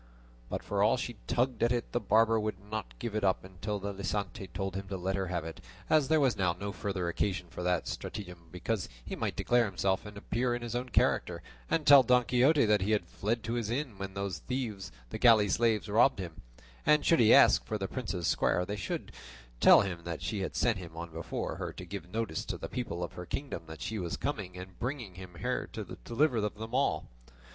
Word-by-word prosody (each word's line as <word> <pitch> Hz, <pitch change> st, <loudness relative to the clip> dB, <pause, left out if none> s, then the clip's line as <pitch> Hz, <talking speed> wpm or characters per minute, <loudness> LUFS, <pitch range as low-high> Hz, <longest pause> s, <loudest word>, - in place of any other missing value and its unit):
But -, -, -3 dB
for 100 Hz, -1 st, -1 dB
all 105 Hz, +4 st, +4 dB
she 120 Hz, -2 st, -4 dB
tugged 125 Hz, -1 st, 0 dB
at 120 Hz, -, +3 dB
it 120 Hz, -1 st, -1 dB
the 120 Hz, -, +1 dB
barber 115 Hz, +1 st, +4 dB
would 105 Hz, -2 st, -2 dB
not 100 Hz, -, -5 dB
give 115 Hz, -, -4 dB
it 110 Hz, -, -1 dB
up 95 Hz, -1 st, +2 dB
until 95 Hz, +3 st, -4 dB
the 100 Hz, +1 st, -4 dB
licentiate 100 Hz, -1 st, -3 dB
told 95 Hz, +1 st, -3 dB
him 95 Hz, 0 st, -4 dB
to 95 Hz, 0 st, -4 dB
let 95 Hz, +2 st, -1 dB
her 95 Hz, -1 st, -1 dB
have 85 Hz, -3 st, -2 dB
it, 80 Hz, -1 st, -8 dB, 0.3 s
as 155 Hz, -3 st, +5 dB
there 160 Hz, 0 st, +4 dB
was 135 Hz, -4 st, +3 dB
now 90 Hz, -3 st, +1 dB
no 100 Hz, +3 st, -5 dB
further 100 Hz, -4 st, -3 dB
occasion 90 Hz, 0 st, -1 dB
for -, -, -6 dB
that 90 Hz, -1 st, 0 dB
stratagem, 90 Hz, -4 st, -6 dB
because 90 Hz, +2 st, -2 dB, 0.2 s
he -, -, -4 dB
might -, -, -2 dB
declare 120 Hz, -1 st, +3 dB
himself 95 Hz, -2 st, 0 dB
and 105 Hz, -1 st, -10 dB
appear 120 Hz, +5 st, -1 dB
in 120 Hz, -, -5 dB
his 120 Hz, -1 st, -4 dB
own 125 Hz, +1 st, -2 dB
character, -, -, +1 dB, 0.3 s
and 155 Hz, -, +1 dB
tell 140 Hz, -2 st, +10 dB
Don 125 Hz, 0 st, +4 dB
Quixote 130 Hz, +4 st, +4 dB
that 105 Hz, -2 st, +3 dB
he 105 Hz, +4 st, +1 dB
had 105 Hz, -5 st, +1 dB
fled 110 Hz, +6 st, -2 dB
to 115 Hz, -, -3 dB
this 115 Hz, -3 st, -1 dB
inn 120 Hz, -4 st, -3 dB
when 95 Hz, -1 st, -5 dB
those 100 Hz, -2 st, -3 dB
thieves 110 Hz, -8 st, -4 dB, 0.2 s
the -, -, -4 dB
galley 110 Hz, -4 st, +6 dB
slaves 110 Hz, +1 st, +2 dB
robbed 115 Hz, +5 st, +4 dB
him; 85 Hz, -4 st, -7 dB, 0.4 s
and 150 Hz, -1 st, +4 dB
should 165 Hz, -, +5 dB
he 110 Hz, -, +6 dB
ask -, -, +7 dB
for 110 Hz, -, -3 dB
the 95 Hz, -1 st, -3 dB
princess's 100 Hz, -9 st, -3 dB
squire, 90 Hz, -, +2 dB
they 105 Hz, +3 st, -4 dB
could 90 Hz, -, -4 dB, 0.5 s
tell -, -, +8 dB
him 90 Hz, -4 st, -4 dB
that 85 Hz, -1 st, -5 dB
she 105 Hz, -, -2 dB
had 95 Hz, -, -3 dB
sent 115 Hz, -5 st, +2 dB
him 85 Hz, -3 st, -10 dB
on 85 Hz, 0 st, -6 dB
before 80 Hz, +1 st, -4 dB
her -, -, -4 dB
to 90 Hz, -, -8 dB
give 90 Hz, 0 st, -7 dB
notice 110 Hz, -7 st, -2 dB
to -, -, -4 dB
the -, -, -5 dB
people 90 Hz, -9 st, -4 dB
of 85 Hz, -, -5 dB
her 90 Hz, -1 st, -8 dB
kingdom 140 Hz, +6 st, -4 dB
that 80 Hz, 0 st, -8 dB
she 110 Hz, -1 st, -3 dB
was 85 Hz, -2 st, -3 dB
coming, 100 Hz, -11 st, -3 dB
and 90 Hz, 0 st, -10 dB
bringing 125 Hz, -6 st, -4 dB, 0.2 s
with 85 Hz, -, -12 dB
her -, -, -1 dB
the -, -, -6 dB
deliverer 120 Hz, -2 st, +1 dB
of 105 Hz, -, -2 dB
them 110 Hz, +2 st, -7 dB
all. 125 Hz, -, +1 dB
105 Hz, 230 wpm, -31 LUFS, 90-120 Hz, 0.5 s, tell